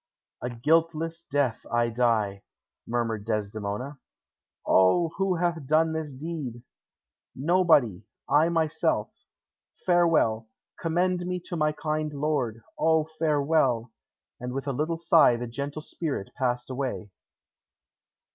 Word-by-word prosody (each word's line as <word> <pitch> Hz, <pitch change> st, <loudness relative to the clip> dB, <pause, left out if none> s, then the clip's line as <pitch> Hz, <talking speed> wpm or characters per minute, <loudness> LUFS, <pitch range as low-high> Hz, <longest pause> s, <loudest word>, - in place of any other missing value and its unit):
"A 125 Hz, -, -2 dB
guiltless 165 Hz, +6 st, +1 dB
death 140 Hz, -5 st, 0 dB
I 120 Hz, 0 st, +2 dB
die," 110 Hz, -4 st, +1 dB, 0.5 s
murmured 115 Hz, -3 st, -1 dB
Desdemona. 105 Hz, +5 st, -3 dB, 0.7 s
"O, 95 Hz, -, +4 dB
who 195 Hz, -2 st, +1 dB
hath 170 Hz, -4 st, -1 dB
done 160 Hz, +2 st, +3 dB
this 160 Hz, -2 st, -3 dB
deed?" 135 Hz, -4 st, -6 dB, 0.7 s
"Nobody; 150 Hz, -, +3 dB, 0.3 s
I 155 Hz, +3 st, +4 dB
myself. 165 Hz, -2 st, 0 dB, 0.7 s
Farewell! 165 Hz, -11 st, +3 dB, 0.3 s
Commend 175 Hz, +1 st, 0 dB
me 180 Hz, 0 st, -2 dB
to 175 Hz, -, -6 dB
my 150 Hz, -2 st, +2 dB
kind 155 Hz, 0 st, -2 dB
lord. 135 Hz, -7 st, -1 dB, 0.2 s
O, 160 Hz, -1 st, +3 dB
farewell!" 145 Hz, -6 st, +2 dB, 0.5 s
And 125 Hz, 0 st, -5 dB
with 135 Hz, +1 st, -3 dB
a 140 Hz, -, -1 dB
little 155 Hz, +5 st, -1 dB
sigh 165 Hz, -6 st, +5 dB
the 120 Hz, -, -4 dB
gentle 140 Hz, +5 st, -5 dB
spirit 150 Hz, -14 st, -4 dB
passed 125 Hz, -1 st, -1 dB
away. 130 Hz, -6 st, -4 dB
145 Hz, 115 wpm, -27 LUFS, 120-165 Hz, 0.7 s, sigh